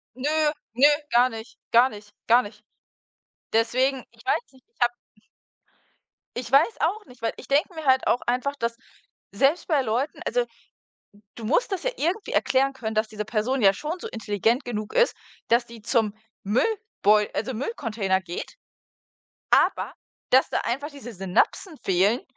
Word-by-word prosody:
Nö, 265 +3 -2 0.4
nö, 270 +5 +6 0.2
gar 245 +2 +5
nicht, 225 +1 -9 0.2
gar 245 +3 +7
nicht, 205 -1 -12
gar 240 +2 +6
nicht. 210 0 -12 0.9
Deswegen 255 +4 +2
ich - - -20
weiß - - +2
nicht, 260 - -22
ich - - -45
habe 240 0 +3 1.4
Ich 245 0 -5
weiß 315 +11 +4
auch 415 +6 0
nicht, 245 -2 -17
weil 225 - 0
ich - - -11
denke 295 +6 +2
mir 315 - -7
halt 260 0 +4
auch 245 - +2
einfach, 255 +4 0
dass 230 -2 -2 0.5
selbst 285 +6 +2
bei 300 -5 +3
Leuten 250 +5 -1
also, - - 0
d - - -30 0.7
du 230 - -9
musst 325 - +1
das 375 - -2
ja - - 0
irgendwie 365 +7 -1
erklären 270 +1 +2
können, 220 -4 -4
dass 215 0 +1
diese 210 -1 -5
Person 240 +5 -1
ja 195 -2 +6
schon 305 - -4
so - - -7
intelligent 225 +3 0
genug 215 -3 -4
ist, - - +3 0.3
dass 235 +1 +3
die 230 -2 -12
zum 220 -3 +1 0.3
Müllbeu 215 - +2
also, 255 +2 -2
Müllcontainer 215 - -1
geht, 175 -1 -7 1.0
aber - - +3 0.4
dass 260 +1 +5
da - - 0
einfach 275 +5 -2
diese 275 -6 -10
Synapsen 195 - 0
fehlen, 195 +6 +2
245 Hz, 165 wpm, -25 LUFS, 220-280 Hz, 1.4 s, gar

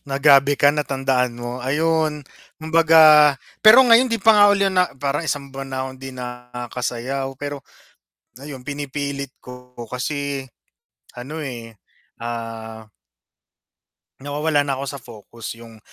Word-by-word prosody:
nagabi 140 0 +4
ka 145 - +5
natandaan 135 -4 -1
mo 120 +1 -6
ayun 155 +2 0 0.4
kumbaga 155 -2 +6 0.3
pero 220 +5 +9
ngayon 235 +2 +5
di 230 - 0
pa 225 +3 +5
nga 205 -1 +6
uli 200 -1 +2
na 180 -1 +1
parang 140 +3 -2
1 140 -2 -3
buwan 130 -1 -5
di 135 0 -8
nakasayaw 125 +1 -5
pero 145 -1 -6 0.8
ayun 140 -2 -9
pinipilit 140 -1 -5
ko 125 0 -13 0.2
kasi 140 +1 -4 0.7
ano 135 +6 -7
eh 115 -4 -8 0.5
ah 115 -1 -7 1.4
nawawala 145 +1 -1
na 140 - -1
ako 135 +1 -5
sa 140 - -8
focus 115 -1 -12
yung 115 -1 -14
140 Hz, 120 wpm, -21 LUFS, 125-150 Hz, 1.4 s, pero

